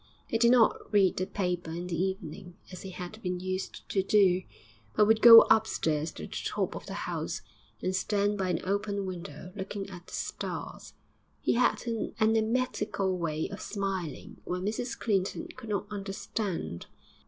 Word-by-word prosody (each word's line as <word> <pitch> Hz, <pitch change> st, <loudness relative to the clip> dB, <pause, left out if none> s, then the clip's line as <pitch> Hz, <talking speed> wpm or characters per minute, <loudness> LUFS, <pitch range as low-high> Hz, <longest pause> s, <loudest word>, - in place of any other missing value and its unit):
He 225 Hz, -, -1 dB
did 235 Hz, 0 st, +6 dB
not 235 Hz, -3 st, +4 dB
read 200 Hz, -3 st, +4 dB
the 185 Hz, -, -1 dB
paper 180 Hz, -4 st, -2 dB
in 170 Hz, +2 st, -4 dB
the 180 Hz, -1 st, -3 dB
evening 190 Hz, -1 st, -5 dB
as 185 Hz, -, -8 dB
he 190 Hz, -, -7 dB
had 180 Hz, +4 st, -8 dB
been 180 Hz, -2 st, -2 dB
used 185 Hz, +1 st, -4 dB
to 195 Hz, -, +2 dB
do, 190 Hz, -2 st, +4 dB, 0.5 s
but 210 Hz, -, +5 dB
would 220 Hz, +1 st, +4 dB
go 230 Hz, -1 st, +12 dB
upstairs 160 Hz, -8 st, +2 dB
to 75 Hz, -, -8 dB
the -, -, -9 dB
top -, -, -1 dB
of -, -, -8 dB
the -, -, -4 dB
house, -, -, -3 dB, 0.4 s
and 185 Hz, 0 st, 0 dB
stand 205 Hz, +2 st, +1 dB
by 190 Hz, -2 st, -1 dB
an 180 Hz, -, 0 dB
open 200 Hz, +1 st, -1 dB
window 180 Hz, -2 st, -7 dB
looking 195 Hz, 0 st, -5 dB
at 175 Hz, -1 st, -10 dB
the -, -, -13 dB
stars. -, -, -5 dB, 0.4 s
He -, -, +1 dB
had 245 Hz, +1 st, +2 dB
an 230 Hz, -3 st, -3 dB
enigmatical 220 Hz, -3 st, +1 dB
way 160 Hz, -3 st, -2 dB
of -, -, -7 dB
smiling 195 Hz, -6 st, -4 dB
which 180 Hz, +1 st, -3 dB
Mrs 225 Hz, +4 st, -2 dB
Clinton 195 Hz, -4 st, -1 dB
could 225 Hz, -, -10 dB
not 200 Hz, -2 st, -1 dB
understand. 195 Hz, -, -4 dB
195 Hz, 170 wpm, -29 LUFS, 180-215 Hz, 0.5 s, go